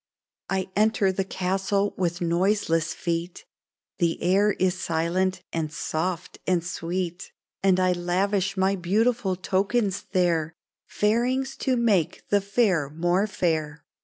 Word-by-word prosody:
" - - -69
I 190 -1 -1
enter 210 -2 +3
the 195 +1 -1
castle 195 +2 -1
with 175 -1 -1
noiseless 170 -1 +1
feet 170 +1 -3 0.3
— - - -68
The 170 -2 +1
air 195 +4 +3
is 185 -1 +1
silent 180 +3 0
and 160 -2 -2
soft 165 +2 -3
and 180 -3 +2
sweet; 175 0 -4 0.3
And 190 -1 +3
I 185 0 +3
lavish 190 +2 0
my 190 +1 +2
beautiful 205 +3 +1
tokens 195 +2 0
there 170 -4 +1 0.2
— - - -69
Fairings 250 +5 +1
to 255 -2 0
make 210 -9 +1
the 205 0 +3
fair 195 - +1
more 175 +6 +1
fair 160 -6 -1
185 Hz, 135 wpm, -25 LUFS, 170-200 Hz, 0.3 s, enter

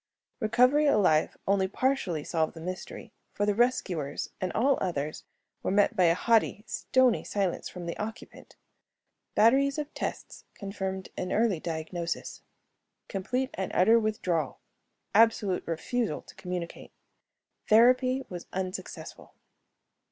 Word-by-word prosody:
Recovery 250 +6 +4
alive 180 - +3
only 195 -1 +3
partially 200 - 0
solved 160 0 -1
the - - -8
mystery, 180 +3 -7 0.2
for 205 - 0
the 205 - +2
rescuers 200 - 0
and 185 - -1
all 270 +5 +2
others 155 -5 -3 0.4
were - - -2
met 205 +1 +3
by 185 - +4
a 165 0 +4
haughty, 225 0 +2
stony 255 -3 +2
silence 195 -4 -2
from 180 -1 -8
the 170 - -4
occupant. 220 +3 -8 0.8
Batteries 270 +6 +4
of 300 0 -4
tests - - -5
confirmed 190 -1 -5
an 185 - -3
early 220 -6 +2
diagnosis: 165 +1 -4 0.7
complete 250 +7 -2
and 190 -1 -3
utter 225 +6 +6
withdrawal; 185 -9 -1 0.6
absolute 210 -4 +4
refusal 215 +8 -2
to - - -14
communicate. 180 -2 -6 0.8
Therapy 255 +4 +5
was 175 -2 -8
unsuccessful. 185 +2 -6
200 Hz, 120 wpm, -28 LUFS, 180-235 Hz, 0.8 s, utter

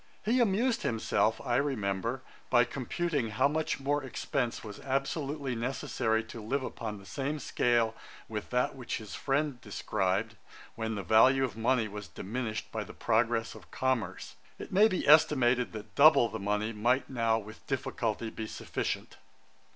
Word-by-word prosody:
He 235 +4 +3
amused 230 +2 +2
himself, 110 -1 +1
I 120 -2 +2
remember, 120 -2 -1 0.3
by 120 -1 +6
computing 135 +2 -2
how 110 +5 +3
much 155 +1 -1
more 145 +1 0
expence 130 -1 -2
was 105 -2 -8
absolutely 140 0 -2
necessary 115 -2 -1
to 110 0 -9
live 130 +6 -1
upon 110 -4 -5
the 100 - -13
same 140 +5 -3
scale 120 -4 +1 0.3
with 105 -2 -5
that 125 +2 +1
which 125 -3 -4
his 110 -2 -9
friend 140 -2 -1
described, 105 -1 -1 0.4
when 110 -1 -3
the 100 - -4
value 130 +7 +5
of 130 - -2
money 115 0 +1
was 105 -2 -7
diminished 110 +6 -4
by 110 -1 -3
the - - -12
progress 115 0 +1
of - - -14
commerce. 130 -4 -2 0.2
It - - -8
maybe 200 -1 +4
estimated 130 -5 +5
that 110 -1 -8
double 140 -5 +7
the - - -5
money 105 +3 -1
might 120 +5 +1
now 115 -3 +1
with 110 0 -10
difficulty 120 -4 -2
be 110 - -5
sufficient. - - -4
120 Hz, 155 wpm, -30 LUFS, 110-135 Hz, 0.4 s, double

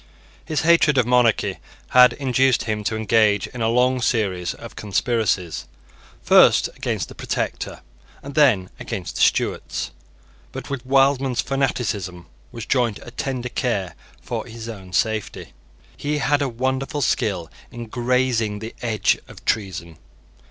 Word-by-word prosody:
His 155 - -1
hatred 160 -3 +4
of 125 - +4
monarchy 125 -2 +2 0.3
had 125 0 +7
induced 130 -1 +2
him 105 -2 -2
to 110 - 0
engage 110 -2 +3
in 125 - -8
a 110 - +2
long 125 +2 +2
series 95 -8 0
of - - -11
conspiracies, 105 - -1 0.6
first - - +6
against - - -2
the - - -11
Protector, - - -4 0.4
and 140 - -8
then 125 -12 +3
against 85 -3 -5
the - - -1
Stuarts. - - 0 0.6
But - - -7
with 130 -2 -5
Wildman's 135 -1 +3
fanaticism 105 -10 -2 0.3
was 115 -2 -7
joined 120 -5 +1
a 120 - -10
tender 125 0 -3
care 110 -7 -2 0.3
for - - -5
his 115 -1 -8
own 95 -5 -9
safety. 110 - -2 0.4
He 150 +1 -2
had 145 0 +1
a 140 - 0
wonderful 130 +4 -2
skill 90 -9 -1 0.2
in 120 -2 -7
grazing 120 -2 0
the 110 +2 -7
edge 115 -3 +1
of - - -14
treason. 85 -7 -2
120 Hz, 140 wpm, -22 LUFS, 105-130 Hz, 0.6 s, had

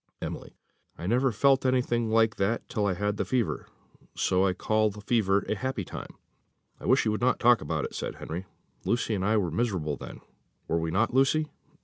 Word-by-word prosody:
Emily. - - -6 0.4
"I 85 - -6
never 125 +6 +2
felt 135 +4 +3
anything 125 -3 +1
like 110 -1 +3
that 100 +4 0
till 110 -4 -1
I 95 - 0
had 105 +2 -1
the - - 0
fever, 125 -5 -1 0.5
so 95 0 +2
I 95 - +1
call 110 +3 +1
the 105 0 -9
fever 100 -2 +1
a - - +1
happy 115 -2 -3
time." - - -8 0.6
"I - - -7
wish - - +4
you 110 - +2
would 105 - -2
not 125 +1 +2
talk 120 -1 +5
about 75 - -2
it," - - -7
said - - -4
Henry; 85 +4 -6 0.4
"Lucy 120 -1 0
and 95 -3 -1
I 110 +3 +2
were 90 -5 0
miserable 85 - -1
then; - - -9 0.5
were 80 0 0
not 100 +8 +1
we, - - +2
Lucy?" 150 +3 +2
110 Hz, 205 wpm, -28 LUFS, 95-120 Hz, 0.6 s, talk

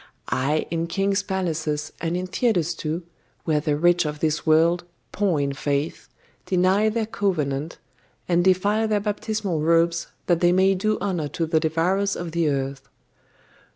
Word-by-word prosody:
Ay, 135 +5 0
in 165 0 -1
king's 195 +2 0
palaces, 160 -6 -2
and 170 +1 -1
in 180 - -3
theatres 180 -4 0
too, 160 +1 -4 0.4
where 155 -2 +1
the 150 0 0
rich 175 +2 +4
of 150 -1 -4
this 155 +1 -1
world, 165 +3 +4 0.3
poor 190 -6 +1
in 140 -1 -1
faith, 140 +2 -2 0.4
deny 190 +4 +3
their 220 0 -1
covenant, 160 -8 -2 0.5
and 175 0 +2
defile 200 +4 +2
their 210 -1 +1
baptismal 205 -4 -2
robes 170 +1 +2 0.2
that 175 -4 +2
they 175 0 +4
may 190 +2 +4
do 215 +3 0
honour 175 -6 -2
to 165 +3 -2
the 160 0 +2
devourers 175 +5 +1
of 175 -1 -5
the 165 -1 +1
earth. 135 -1 -3
170 Hz, 155 wpm, -24 LUFS, 155-190 Hz, 0.5 s, rich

